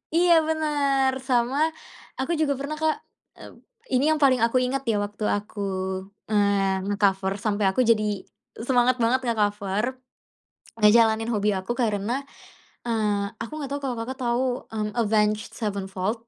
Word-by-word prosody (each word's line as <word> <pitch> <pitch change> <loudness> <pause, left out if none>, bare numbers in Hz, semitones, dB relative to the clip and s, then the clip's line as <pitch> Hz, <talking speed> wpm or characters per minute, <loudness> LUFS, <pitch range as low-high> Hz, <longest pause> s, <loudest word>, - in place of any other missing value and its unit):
iya, 350 0 +4 0.2
benar. 290 -4 +1 0.2
Sama 245 +1 +1 0.6
aku 265 +6 -1
juga 285 -2 +2
pernah, 285 +2 -4
Kak, 315 -1 +2 0.4
mmm. - - -12 0.4
Ini 255 +2 +3
yang - - -4
paling 260 -3 +5
aku 235 +2 +1
ingat, 265 0 -2
ya, 220 - +2
waktu 205 +1 -8
aku, 205 +1 -3 0.7
eee, 200 -2 +2
nge-cover, 195 -1 +1
sampai 205 0 -1
aku 190 +7 +2
jadi 215 -3 +1 0.4
semangat 250 -1 +3
banget 250 +3 +3
nge-cover, 210 +2 -1 0.8
ngejalanin 220 +1 +5
hobi 210 -3 +1
aku, 240 +6 -4
karena, 235 +2 -1 0.6
eee, 210 -3 0
aku 230 - -6
enggak 285 -3 -5
tahu 285 - -3
kalau 250 -2 -2
Kakak 260 +3 -6
tahu, 245 0 0 0.2
mmm, 215 -1 -3
Avenged 215 -1 +1
Sevenfold? 200 0 -3
225 Hz, 140 wpm, -25 LUFS, 205-260 Hz, 0.8 s, paling